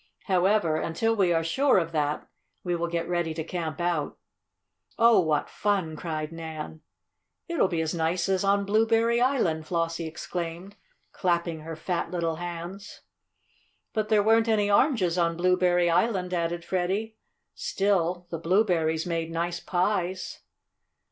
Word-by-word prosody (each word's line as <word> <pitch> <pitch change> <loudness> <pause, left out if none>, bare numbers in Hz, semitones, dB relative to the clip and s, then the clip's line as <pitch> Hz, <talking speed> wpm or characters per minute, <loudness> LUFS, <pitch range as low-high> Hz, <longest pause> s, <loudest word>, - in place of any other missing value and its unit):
However, 185 -3 +2
until 225 +9 0
we 190 -4 +2
are 165 -1 +2
sure 265 - +3
of 165 -2 0
that, 150 -2 -1 0.4
we 175 -1 -1
will 170 0 -1
get 170 0 -2
ready 175 -2 -1
to 160 - -3
camp 165 -2 -4
out." 170 -4 -1 0.8
"Oh, 230 -1 +6
what 155 -4 +1
fun!" 195 -6 -1
cried 155 -1 -4
Nan. 160 -1 -7 0.7
"It'll 335 - +2
be 170 -3 -1
as 160 -1 -2
nice 170 +2 0
as 190 -1 +1
on 200 0 +2
Blueberry 225 +3 +2
Island!" 180 - +1
Flossie 165 -1 -1
exclaimed, 170 +4 -6 0.4
clapping 170 -3 -1
her 160 +1 -7
fat 170 +2 -2
little 165 -3 -2
hands. 175 +3 -7 0.9
"But 215 -1 -1
there 210 -2 +4
weren't 225 +1 +4
any 210 -2 +2
oranges 200 - +3
on 170 -1 +1
Blueberry 180 0 +3
Island," 180 +1 +1
added 170 0 -2
Freddie. 195 +5 -2 0.4
"Still 180 -3 0
the 165 - -3
blueberries 165 -3 +1
made 165 -2 -2
nice 170 +1 -2
pies." 185 0 -1
175 Hz, 140 wpm, -27 LUFS, 165-200 Hz, 0.9 s, Oh